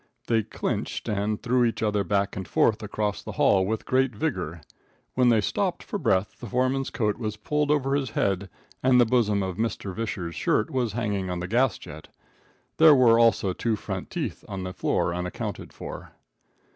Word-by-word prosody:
They 115 Hz, -1 st, +2 dB
"clinched" -, -, -3 dB
and 105 Hz, 0 st, -1 dB
threw 125 Hz, +1 st, +2 dB
each 115 Hz, -1 st, 0 dB
other 105 Hz, -2 st, +1 dB
back 100 Hz, +1 st, 0 dB
and 95 Hz, -2 st, -5 dB
forth -, -, +2 dB
across 105 Hz, -1 st, -2 dB
the -, -, -7 dB
hall 95 Hz, -1 st, +3 dB
with 110 Hz, +1 st, -2 dB
great 130 Hz, 0 st, +1 dB
vigor. 90 Hz, -, -3 dB, 0.5 s
When 125 Hz, -1 st, +4 dB
they 115 Hz, -2 st, +4 dB
stopped 95 Hz, -, -1 dB
for -, -, -4 dB
breath, 95 Hz, +2 st, 0 dB
the 120 Hz, -, -7 dB
foreman's 130 Hz, +4 st, 0 dB
coat 105 Hz, -3 st, -1 dB
was 110 Hz, -2 st, -3 dB
pulled 150 Hz, +7 st, -1 dB
over 140 Hz, -2 st, +2 dB
his 135 Hz, -3 st, -1 dB
head 100 Hz, -2 st, -1 dB, 0.3 s
and 130 Hz, -1 st, +5 dB
the 120 Hz, -, +6 dB
bosom 110 Hz, -4 st, +2 dB
of 95 Hz, -1 st, -4 dB
Mr. 110 Hz, -4 st, -2 dB
Visscher's 95 Hz, -6 st, -4 dB
shirt 105 Hz, -, 0 dB
was 125 Hz, -5 st, -1 dB
hanging 100 Hz, -4 st, -2 dB
on 90 Hz, -1 st, -3 dB
the 90 Hz, -, -4 dB
gas 125 Hz, +6 st, +2 dB
jet. 80 Hz, +1 st, -11 dB, 0.7 s
There 160 Hz, -2 st, +8 dB
were 120 Hz, -3 st, +5 dB
also 115 Hz, -5 st, +3 dB
two 115 Hz, +2 st, -1 dB
front -, -, -5 dB
teeth -, -, -4 dB
on 95 Hz, -1 st, -4 dB
the 90 Hz, 0 st, -5 dB
floor 85 Hz, -, 0 dB
unaccounted 90 Hz, 0 st, -5 dB
for. -, -, -9 dB
110 Hz, 185 wpm, -26 LUFS, 95-125 Hz, 0.7 s, There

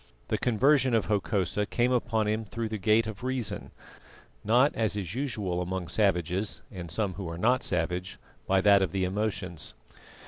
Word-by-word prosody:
The -, -, 0 dB
conversion 130 Hz, +2 st, +3 dB
of 110 Hz, -, +2 dB
Hokosa 105 Hz, -1 st, 0 dB
came 120 Hz, +1 st, +1 dB
upon 115 Hz, -3 st, +1 dB
him 110 Hz, +1 st, 0 dB
through 110 Hz, +1 st, -4 dB
the 110 Hz, -1 st, -4 dB
gate 110 Hz, +3 st, +3 dB
of 110 Hz, +1 st, -7 dB
reason, 130 Hz, -3 st, -3 dB, 0.7 s
not 125 Hz, +6 st, +4 dB
as 110 Hz, -2 st, 0 dB
is 95 Hz, -3 st, -4 dB
usual 105 Hz, -9 st, -2 dB
among 90 Hz, -1 st, -3 dB
savages 95 Hz, -1 st, 0 dB
and 90 Hz, -5 st, -7 dB
some 100 Hz, -1 st, -1 dB
who 95 Hz, -3 st, -6 dB
are 85 Hz, -, -6 dB
not 120 Hz, +7 st, +2 dB
savage 90 Hz, +1 st, -1 dB, 0.3 s
by 95 Hz, 0 st, +3 dB
that 100 Hz, 0 st, +6 dB
of 95 Hz, -4 st, -1 dB
the 95 Hz, -1 st, 0 dB
emotions. 95 Hz, -3 st, -3 dB
105 Hz, 170 wpm, -28 LUFS, 95-115 Hz, 0.7 s, that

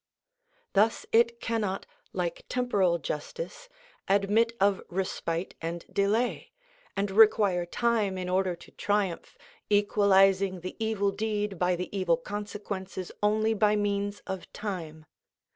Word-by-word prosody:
Thus 215 Hz, +3 st, +3 dB
it 235 Hz, +1 st, +4 dB
cannot, 215 Hz, -5 st, -2 dB, 0.3 s
like 175 Hz, -2 st, -3 dB
temporal 200 Hz, -9 st, +2 dB
justice, -, -, -6 dB, 0.4 s
admit 205 Hz, +4 st, +3 dB
of 200 Hz, 0 st, +3 dB
respite 175 Hz, -1 st, -2 dB
and 170 Hz, +1 st, -4 dB
delay, 215 Hz, +5 st, 0 dB, 0.5 s
and 200 Hz, 0 st, 0 dB
require 200 Hz, -4 st, +5 dB
time 215 Hz, -2 st, +1 dB
in 180 Hz, -1 st, -3 dB
order 185 Hz, 0 st, +1 dB
to 170 Hz, -, -16 dB
triumph, 205 Hz, -4 st, -1 dB, 0.3 s
equalising 195 Hz, -2 st, +4 dB
the 185 Hz, -, -6 dB
evil 205 Hz, -2 st, +1 dB
deed 210 Hz, -2 st, -2 dB
by 180 Hz, 0 st, +2 dB
the 180 Hz, +3 st, -5 dB
evil 180 Hz, -4 st, +2 dB
consequences 200 Hz, -1 st, -5 dB
only 215 Hz, +1 st, +2 dB
by 210 Hz, 0 st, +3 dB
means 205 Hz, 0 st, -1 dB
of 190 Hz, -1 st, -6 dB
time. 165 Hz, -7 st, -5 dB
200 Hz, 120 wpm, -28 LUFS, 185-210 Hz, 0.5 s, require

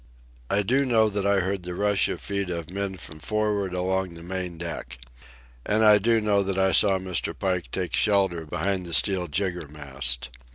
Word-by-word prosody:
I 100 Hz, +1 st, +2 dB
do 130 Hz, +7 st, +2 dB
know 115 Hz, -4 st, +3 dB
that 100 Hz, -1 st, -1 dB
I 100 Hz, -1 st, +3 dB
heard 95 Hz, +1 st, -2 dB
the 90 Hz, 0 st, -5 dB
rush 100 Hz, 0 st, +2 dB
of -, -, -4 dB
feet 100 Hz, -2 st, -3 dB
of 85 Hz, -1 st, -5 dB
men 100 Hz, 0 st, -4 dB
from 75 Hz, -3 st, -11 dB
for'ard 105 Hz, -1 st, -1 dB
along 95 Hz, -1 st, -2 dB
the 85 Hz, -, -10 dB
main 90 Hz, -1 st, -5 dB
deck. 85 Hz, -5 st, -7 dB, 0.7 s
And 110 Hz, +1 st, +2 dB
I 105 Hz, -1 st, +7 dB
do 115 Hz, +2 st, +2 dB
know 105 Hz, -2 st, +1 dB
that 95 Hz, -1 st, -2 dB
I 95 Hz, 0 st, +2 dB
saw 95 Hz, -1 st, +4 dB
Mr. 95 Hz, -1 st, -3 dB
Pike 90 Hz, -3 st, -2 dB
take 90 Hz, -5 st, -2 dB
shelter 95 Hz, -6 st, +1 dB
behind 95 Hz, +2 st, -2 dB
the 85 Hz, -, -3 dB
steel 90 Hz, +1 st, +4 dB
jiggermast. 75 Hz, -8 st, -1 dB
95 Hz, 190 wpm, -25 LUFS, 85-100 Hz, 0.7 s, I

